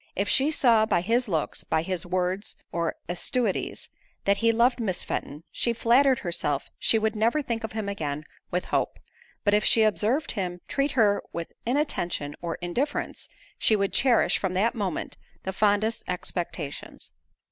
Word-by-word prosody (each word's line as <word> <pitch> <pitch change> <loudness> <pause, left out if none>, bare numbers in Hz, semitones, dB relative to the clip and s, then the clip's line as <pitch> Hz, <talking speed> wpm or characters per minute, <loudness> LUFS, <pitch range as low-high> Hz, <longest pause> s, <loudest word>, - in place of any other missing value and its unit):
If 200 +2 0
she 275 +3 +3
saw 230 -7 +4
by 175 - +2
his 230 +6 +1
looks, 160 -6 -1
by 160 - 0
his 180 0 -3
words, 185 +3 -1 0.2
or 170 -1 -1
assiduities, 195 +5 -2 0.3
that 200 0 +3
he 230 +1 +3
loved 240 +2 +3
Miss 190 -6 -1
Fenton, 150 +3 -4
she 235 - +1
flattered 250 +4 +4
herself 150 -7 -2
she 225 - +3
would 220 0 0
never 230 +8 +2
think 235 -3 -3
of 220 - -4
him 220 -2 -3
again 150 -7 -3 0.3
with 180 +1 -1
hope; - - +1 0.5
but 205 - +3
if 210 0 +4
she 225 - +5
observed 220 +7 +1
him 180 -4 -3
treat 280 0 0
her 210 -5 +3
with 170 -1 -5
inattention 175 - -1
or 170 -1 -3
indifference, 250 - -2 0.3
she 220 - +4
would 200 -1 0
cherish, 250 -3 +3
from 185 -2 -2
that 215 +5 +2
moment, 200 -5 -3 0.3
the 190 - -3
fondest 210 +2 +2
expectations. 175 -4 -4
205 Hz, 165 wpm, -26 LUFS, 180-235 Hz, 0.5 s, she